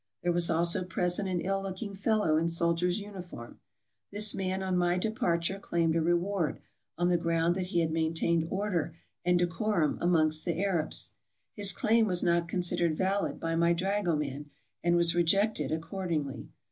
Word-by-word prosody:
There 175 - +2
was 170 0 +2
also 170 +3 +2
pres 180 0 -2
ent 200 - -2
an 180 -2 -1
ill 195 +2 -1
looking 195 +2 -5
fellow 200 -4 +1
in 165 +2 +1
soldier's 170 +2 0
uniform. 185 - -9 0.5
This 210 +1 +1
man 190 0 -2
on 185 -1 -1
my 175 0 +2
departure 190 -3 -1
claimed 165 -4 0
a 165 - +2
reward, 175 -1 0 0.4
on 175 0 +2
the 175 -1 +2
ground 165 0 +1
that 185 -1 -2
he 175 -2 +1
had 160 -1 0
maintained 160 0 0
order 180 -5 -2 0.3
and 180 0 +3
decorum 175 -1 0
amongst 155 -3 +2
the 170 -1 -2
Arabs. 185 -5 -1 0.4
His 205 -2 +3
claim 225 +3 +2
was 180 -3 +2
not 170 -1 +2
considered 175 -3 0
valid 195 +2 0
by 165 0 -2
my 170 +1 +3
dragoman, 165 -7 -1 0.3
and 170 0 +3
was 170 -1 +3
rejected 195 +4 +2
accordingly. 160 -4 -3
175 Hz, 165 wpm, -30 LUFS, 165-190 Hz, 0.5 s, and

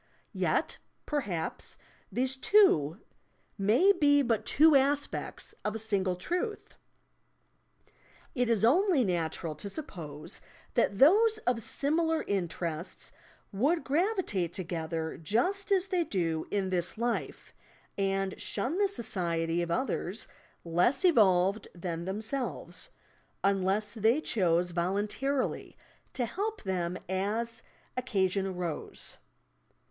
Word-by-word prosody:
Yet, - - 0 0.3
perhaps, 205 - -3 0.3
these 260 +1 0
two 225 - +4 0.5
may 225 - +4
be 290 -6 +4
but 230 -4 0
two 310 +1 +6
aspects 280 +1 +1
of 210 +1 -2
a - - -1
single 200 -4 0
truth! 360 - -3 1.6
It 245 -3 0
is 225 -2 +3
only 335 - +4
natural 170 -4 -1
to 155 +7 -5
suppose 165 - -7 0.3
that 200 - +2
those 425 - +6
of 245 -2 +1
similar 320 +7 0
interests 170 -3 -3 0.4
would 280 - +1
gravitate 290 - 0
together 165 -3 -3
just 370 - 0
as 385 -1 +2
they 360 -2 +2
do 165 - -1
in 195 -2 -1
this 180 +1 -1
life, 235 +1 -3 0.4
and 195 -1 -1
shun 315 +10 -1
the 410 - +4
society 175 - -1
of 170 - -3
others 215 -1 -2 0.4
less 175 - +2
evolved 200 - +4
than 170 -1 -4
them.'selves 200 - -3 0.5
(unless 195 +1 +1
they 225 +5 +3
chose 180 - +1
voluntarily 205 +10 -1 0.4
to 250 - -1
help 420 - -3
them 180 -2 -2
as 220 +5 -2 0.3
occasion 195 -6 0
arose). 180 -4 -3
210 Hz, 110 wpm, -30 LUFS, 180-280 Hz, 1.6 s, two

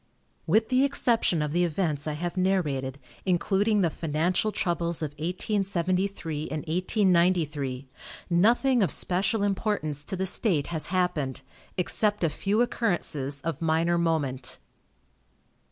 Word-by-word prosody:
With 220 +6 +3
the 255 +1 +3
exception 235 - +2
of 150 - -2
the 175 +3 +2
events 160 -3 -1
I 155 - -1
have 170 +4 -4
narrated, 150 -9 0 0.3
including 195 +3 +2
the 170 -3 +2
financial 170 +7 0
troubles 170 -3 0
of 150 - -3
1873 185 -2 -1
and 155 - -3
1893, 170 - +1 0.4
nothing 235 +8 +3
of 190 - +3
special 195 +7 +1
importance 195 -8 -1
to 190 - -3
the 190 +1 -1
state 185 - +1
has 155 -1 -1
happened, 170 -8 -1 0.3
except 205 +2 0
a 165 - +2
few 205 +9 +1
occurrences 150 - -1
of 165 -1 -4
minor 165 +2 +2
moment. 145 -7 -1
175 Hz, 125 wpm, -27 LUFS, 155-195 Hz, 0.4 s, With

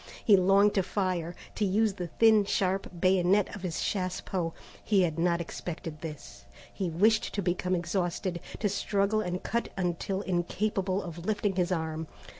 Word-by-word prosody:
He 210 - +7
longed 195 +2 +5
to 195 - +3
fire, 180 -3 -2 0.2
to - - -2
use 205 +2 +2
the 180 -2 -5
thin 220 +4 +5
sharp 195 -1 0
bayonet 185 +2 +3
on 205 - -8
his 180 -4 -3
chassepot. 185 -2 -2 0.3
He 200 -3 +3
had 165 -2 -1
not 170 0 +2
expected 165 -2 -6
this. 155 -3 -8 0.3
He 190 -3 -2
wished 215 +7 +2
to 200 - 0
become 180 +1 0
exhausted, 175 0 -2 0.2
to 210 - 0
struggle 200 +1 +1
and 180 -2 -3
cut 235 +1 -1
until 185 +2 -1
incapable 190 +1 -1
of 170 0 -8
lifting 205 -2 0
his 180 0 +1
arm. 160 -2 -2
185 Hz, 160 wpm, -29 LUFS, 175-200 Hz, 0.3 s, He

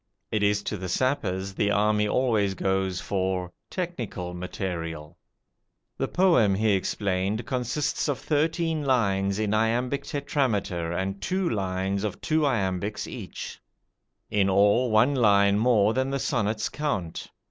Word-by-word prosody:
It 110 - 0
is 105 0 +2
to 105 - -3
the 95 -1 -5
sappers 95 -5 -1
the 100 +1 +1
army 105 +1 +2
always 105 -5 +1
goes 95 0 0
for 95 -1 -2 0.2
"technical 120 - -4
material". 85 -3 -5 0.8
The - - 0
poem, 165 - +3
he 110 +2 +2
explained, 95 +2 -1
consists 130 +4 -1
of 140 - 0
thirteen 160 +1 0
lines 100 -7 +1
in 105 -1 0
iambic 120 +5 +1
tetrameter 110 - -1
and 95 +2 -3
two 185 - 0
lines 95 - -1
of 105 -3 -3
two 155 -2 +1
iambics 100 -4 -1
each; - - -7 0.7
in 100 -2 +2
all, 105 +6 +4
one 110 +6 +4
line 100 -5 +4
more 110 -3 +4
than 130 +2 0
the 140 - -1
sonnet's 110 -5 0
count. 100 - -3
105 Hz, 135 wpm, -26 LUFS, 95-125 Hz, 0.8 s, all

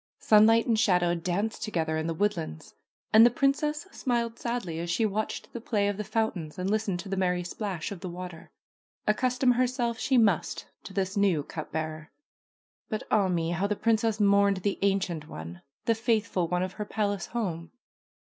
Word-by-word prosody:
Sunlight 225 +2 +5
and 225 -2 +2
shadow 180 -5 +3
danced 185 +7 -2
together 165 -8 -1
in 160 +1 -1
the 165 - -1
woodlands. 170 - -2 0.4
And 220 +1 +9
the 240 - +8
princess 290 - 0
smiled 235 -3 -1
sadly 235 -9 -3
as 170 +1 -4
she 220 +6 +2
watched 215 +1 -3
the 235 - -5
play 205 -3 0
of 205 -1 -1
the 210 - -2
fountains 210 -7 -2
and 180 +1 -2
listened 215 -4 0
to 200 - -10
the 195 - -1
merry 180 -1 0
splash 185 -1 -4
of 200 - -6
the 180 - -6
water. 175 -1 -8 0.6
Accustom 250 +3 +2
herself 245 -2 0
she 260 +3 +2
must 205 -8 +2 0.2
to 195 - -9
this 190 0 -1
new 195 -7 +2
cup 155 +2 -7
bearer. 155 0 -4 0.8
But 215 -2 -3
ah 200 -3 +4
me! 170 -2 0
how 180 +4 0
the 210 - 0
princess 225 0 +1
mourned 200 -1 +4
the 200 - 0
ancient 190 -6 0
one, 85 - -8 0.2
the 230 - +4
faithful 225 -5 0
one 180 +2 0
of 185 0 -4
her 210 - -5
palace 205 -3 -1
home 175 -8 -3
200 Hz, 185 wpm, -28 LUFS, 175-225 Hz, 0.8 s, And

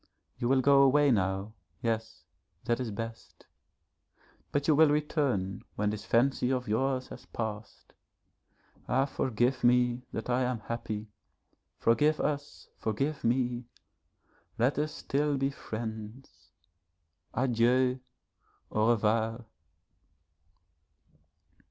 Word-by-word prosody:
You 120 - 0
will 135 0 +4
go 140 +1 +6
away 140 +1 +5
now, 95 0 0 0.3
yes, 110 -1 -2 0.4
that 120 +1 +1
is 125 -3 -2
best, 115 +2 -7 1.1
but 145 0 0
you 155 - +6
will 155 +1 +6
return 145 - 0
when 105 0 0
this 105 0 -6
fancy 125 +2 +2
of 125 -1 -1
yours 130 +4 0
has - - -11
passed. 110 -2 -6 0.9
Ah 135 +1 +2
forgive 130 -2 0
me 125 0 +3
that 110 - -5
I 125 +1 +1
am 125 -3 -1
happy 110 -1 -5 0.7
forgive 150 +7 +3
us, 145 -1 -3
forgive 135 +8 -2
me. 120 0 0 0.9
Let 125 +5 +2
us 150 +1 -1
still 145 0 -1
be 135 +1 0
friends. 110 0 -7 0.9
Adieu! 125 +1 +2 0.7
Au 110 +1 +2
revoir. 115 +1 +1
120 Hz, 110 wpm, -30 LUFS, 110-135 Hz, 1.1 s, go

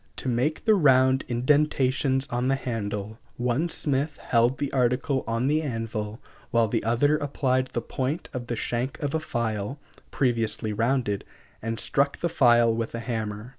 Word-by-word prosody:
To - - -5
make 130 - 0
the 220 - +6
round 130 -7 +4
indentations 135 +1 +2
on 120 +1 0
the 135 - +3
handle, 110 -4 -4 0.2
one 125 +7 0
smith 145 -1 0
held 120 +2 +2
the 145 0 -3
article 130 +2 +1
on 115 +2 0
the 150 +3 +2
anvil 115 -5 -4 0.3
while 115 -1 +3
the - - -1
other 125 +7 +2
applied 130 -3 0
the 120 -2 -4
point 135 +7 -3
of 125 -2 -5
the 120 - -2
shank 120 +4 -2
of 140 - -1
a 160 - +1
file 115 -2 -3 0.3
previously 115 -4 0
rounded 115 -2 0 0.4
and 115 +1 -2
struck 140 0 +1
the 170 - -1
file 120 -7 +4
with 115 0 -3
a - - -3
hammer. 110 -1 -4
125 Hz, 165 wpm, -26 LUFS, 115-135 Hz, 0.4 s, the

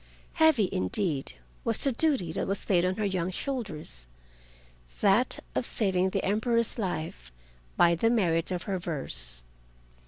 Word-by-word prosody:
Heavy, 315 -10 +6
indeed, 135 - -1 0.3
was 230 -2 +1
the 275 - +3
duty 260 - +1
that - - -2
was 195 0 -2
laid 175 -3 +3
on 185 +1 +1
her 215 - -1
young 185 -3 -1
shoulders—that - - -3
of - - 0
saving 190 -6 +1
the - - -2
Emperor's 230 +3 +1
life 155 - -4 0.5
by 170 0 +6
the 200 +7 +2
merit 175 -8 +2
of 180 -2 -2
her 190 -2 -2
verse. 60 - -4
180 Hz, 135 wpm, -28 LUFS, -, 0.5 s, Heavy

